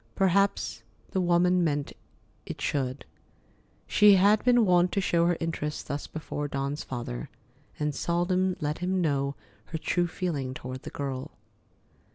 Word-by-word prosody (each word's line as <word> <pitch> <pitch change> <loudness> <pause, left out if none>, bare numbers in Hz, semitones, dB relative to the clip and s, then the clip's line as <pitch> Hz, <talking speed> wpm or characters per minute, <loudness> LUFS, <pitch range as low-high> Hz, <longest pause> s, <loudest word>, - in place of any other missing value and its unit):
Perhaps 195 +1 +1 0.3
the 190 - +1
woman 180 +1 +3
meant 145 -3 -1 0.5
it - - -6
should. 130 -1 -2 0.8
She 210 -1 +6
had 205 +3 +4
been 245 -2 +5
wont 180 -1 +4
to 200 - +1
show 170 -3 +2
her 175 -1 +1
interest 160 -3 -3
thus 140 +1 -4
before 150 -2 -4
Dawn's 140 +1 -3
father, 120 - -5 0.5
and 150 -1 0
seldom 180 +3 0
let 150 -1 -2
him 185 +1 0
know 140 -4 0 0.3
her 160 - -4
true 175 +2 0
feeling 150 -8 -3
toward 130 0 -6
the - - -7
girl. 135 -2 -5
170 Hz, 145 wpm, -28 LUFS, 140-185 Hz, 0.8 s, She